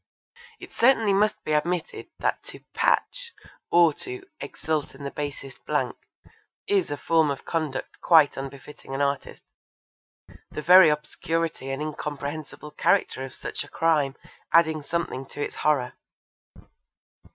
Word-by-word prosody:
It - - -12
certainly 230 -4 +4
must 210 +2 +1
be - - -3
admitted 165 +3 -1
that - - -1
to - - -10
'patch' - - 0 0.4
or 170 -2 +5
to 380 0 -6 0.2
'exult 155 -2 -3
in 140 - -11
the 140 - -4
basest 140 -2 -6
blank' - - 0 0.7
is 195 -3 +1
a 145 - -3
form 160 -1 +2
of 140 - -4
conduct 155 -5 -3
quite 160 -4 +5
unbefitting 135 0 -8
an 140 - -1
artist, 140 0 -3 1.1
the 150 - -6
very 180 +1 +8
obscurity 150 -1 -2
and 135 +2 -3
incomprehensible 150 0 -6
character 130 -2 +1
of 135 -1 -8
such - - -5
a - - -13
crime 150 -4 +1 0.4
adding 160 -2 +4
something 145 -3 -3
to 145 - -12
its - - -6
horror. 145 -5 +1
150 Hz, 135 wpm, -25 LUFS, 140-170 Hz, 1.1 s, very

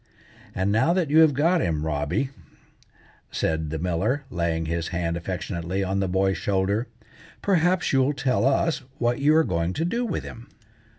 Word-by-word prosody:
"And 95 +2 0
now 130 +10 +3
that 175 -6 0
you 155 - +6
have 155 -4 +6
got 165 +5 +3
him, 80 -4 -1
Robby," 80 - -1 1.0
said 80 -1 -1
the 80 - -3
miller, 90 - -1
laying 85 -2 -1
his 85 +1 -2
hand 85 -1 -2
affectionately 90 +1 -3
on 95 +1 -1
the 95 - 0
boy's 95 +1 +1
shoulder. 100 +4 0 0.6
"perhaps 180 -3 +2
you'll 135 +2 +3
tell 130 -4 0
us 140 +5 +2 0.2
what 120 0 0
you 150 +2 +4
are 160 - +5
going 85 - -1
to 160 - -1
do 235 +8 -1
with 225 -7 -2
him." 115 +2 -10
100 Hz, 170 wpm, -25 LUFS, -, 1.0 s, you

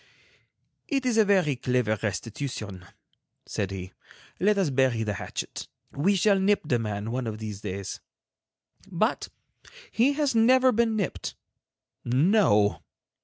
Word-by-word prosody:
"It 275 -3 -1
is 245 -3 +1
a 220 - +6
very 185 -8 +3
clever 125 -3 0
restitution," 105 -2 -5 0.6
said 100 -3 -3
he. 95 -1 -7 0.5
"Let 205 +2 +3
us 185 -7 +1
bury 130 -4 +2
the 105 -1 -2
hatchet. - - -6 0.2
We 190 +9 +1
shall 195 +1 +3
nip 200 +2 +2
the 125 -5 +1
man 105 0 -3
one 125 -1 -2
of 110 -1 -4
these 105 -2 -6
days." 100 -2 -5 0.9
But 195 +5 -1 0.6
he 255 +5 +3
has 290 -2 0
never 255 +3 +5
been 225 -1 +1
nipped. 200 -4 -3 0.7
No. 125 - +3
135 Hz, 130 wpm, -26 LUFS, -, 0.9 s, a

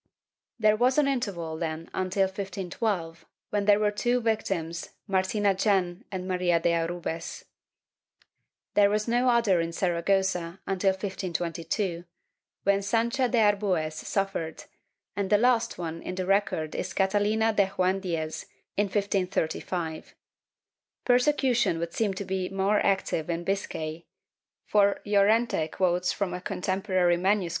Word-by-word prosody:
There 215 -2 +4
was 250 +5 +2
an 295 -2 +4
interval 195 -12 -2
then 165 0 -4
until 190 +1 0
1512, 190 -2 -3 0.3
when 205 -1 0
there 205 0 +5
were 210 -1 +2
two 240 +4 +1
victims, 195 -8 -2 0.2
Martina 195 +1 +1
Gen 190 +1 0
and 185 -1 -4
Maria 180 -2 +2
de 170 +1 +2
Arbues. 165 0 -3 1.3
There 205 -1 +5
was 210 +1 0
no 245 +2 +2
other 225 -7 +3
in 165 0 -2
Sara 170 -1 -1
gossa 190 -2 0
until 195 0 +1
1522, 175 -1 -3 0.6
when 200 0 +3
Sancha 235 +5 +1
de 245 - +1
Arbues 200 -7 +2
suffered, 165 -2 -3 0.5
and 200 -1 -1
the 210 - +5
last 240 +1 +2
one 165 -1 -5
in 185 - -5
the 185 0 -2
record 190 -5 +1
is - - -4
Catalina 210 +3 +2
de 200 -2 +2
Joan 185 +1 +2
Diez, 165 -4 -4 0.3
in 205 0 +1
1535/ 180 -4 -2 0.9
Persecution 245 - +3
would 170 0 -4
seem 205 -4 0
to 200 - -5
be 185 -1 -2
more 195 +2 +1
active 190 -5 0
in 170 0 -2
Biscay, 170 -4 -3 0.6
for 200 -1 +3
Llorente 205 -3 +3
quotes 180 +1 +1
from 195 -3 -2
a 180 - -5
contemporary 185 -1 0
MS. 190 0 +1
190 Hz, 135 wpm, -27 LUFS, 175-210 Hz, 1.3 s, there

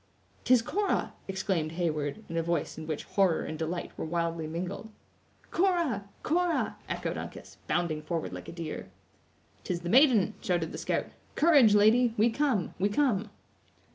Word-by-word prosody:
"'Tis 250 -3 +5
Cora!" 405 - -1
exclaimed 190 -5 -1
Heyward, 165 +2 -2
in 165 - -6
a 165 - +2
voice 170 -1 -1
in 155 -1 -8
which 155 -2 -3
horror 190 -5 +2
and 155 - -5
delight 165 +2 -3
were - - -5
wildly 165 -1 -2
mingled. 180 +6 -5 0.6
"Cora! 335 - +1
Cora!" 345 +1 +1
echoed - - -3
Uncas, - - -9
bounding 170 -3 0
forward 160 +1 -3
like - - -7
a - - -6
deer. 165 -2 -6 0.7
"'Tis 175 -1 -3
the 175 - -4
maiden!" 235 -4 +5
shouted 175 -3 0
the - - -6
scout. - - -1 0.3
"Courage, 285 -10 +6
lady; 225 +3 +5
we 225 +3 +4
come! 255 - 0
we 200 +2 +2
come!" 215 -3 +1
190 Hz, 155 wpm, -29 LUFS, 165-235 Hz, 0.7 s, Courage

